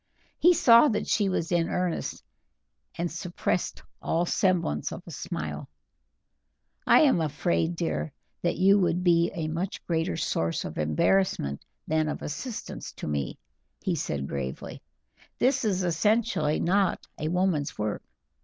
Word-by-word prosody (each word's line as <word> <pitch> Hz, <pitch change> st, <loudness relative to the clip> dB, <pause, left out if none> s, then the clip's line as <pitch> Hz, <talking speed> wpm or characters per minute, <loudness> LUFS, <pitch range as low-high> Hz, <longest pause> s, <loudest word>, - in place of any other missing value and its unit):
He 350 Hz, +1 st, +6 dB
saw 235 Hz, 0 st, +7 dB
that 215 Hz, -6 st, 0 dB
she 205 Hz, -3 st, +1 dB
was 170 Hz, -2 st, -2 dB
in 170 Hz, -1 st, +2 dB
earnest, 180 Hz, -2 st, -2 dB, 0.7 s
and 170 Hz, 0 st, -2 dB
suppressed 175 Hz, +1 st, -2 dB, 0.2 s
all 170 Hz, +2 st, 0 dB
semblance 180 Hz, -1 st, +1 dB
of -, -, -7 dB
a -, -, -9 dB
smile. -, -, -5 dB, 1.2 s
"I -, -, +7 dB
am 270 Hz, -, +4 dB
afraid, 85 Hz, -, 0 dB
dear, 75 Hz, -1 st, -2 dB, 0.3 s
that -, -, 0 dB
you 195 Hz, +3 st, +5 dB
would 175 Hz, -1 st, +1 dB
be 170 Hz, -1 st, +4 dB
a 160 Hz, -3 st, -2 dB
much 170 Hz, +5 st, -4 dB
greater 160 Hz, -, -1 dB
source 85 Hz, 0 st, -1 dB
of 80 Hz, -, -6 dB
embarrassment 75 Hz, -, +1 dB, 0.2 s
than 155 Hz, 0 st, +1 dB
of -, -, -5 dB
assistance 210 Hz, -, -6 dB
to -, -, -7 dB
me," 70 Hz, -3 st, -2 dB, 0.5 s
he -, -, 0 dB
said 70 Hz, -1 st, -2 dB
gravely. 65 Hz, -2 st, -5 dB, 0.6 s
"This 260 Hz, +1 st, +2 dB
is 190 Hz, -4 st, +1 dB
essentially 175 Hz, -3 st, +1 dB
not 190 Hz, +1 st, +1 dB
a 155 Hz, -, -2 dB
woman's 175 Hz, -4 st, 0 dB
work. 105 Hz, 0 st, -2 dB
170 Hz, 140 wpm, -27 LUFS, 140-190 Hz, 1.2 s, saw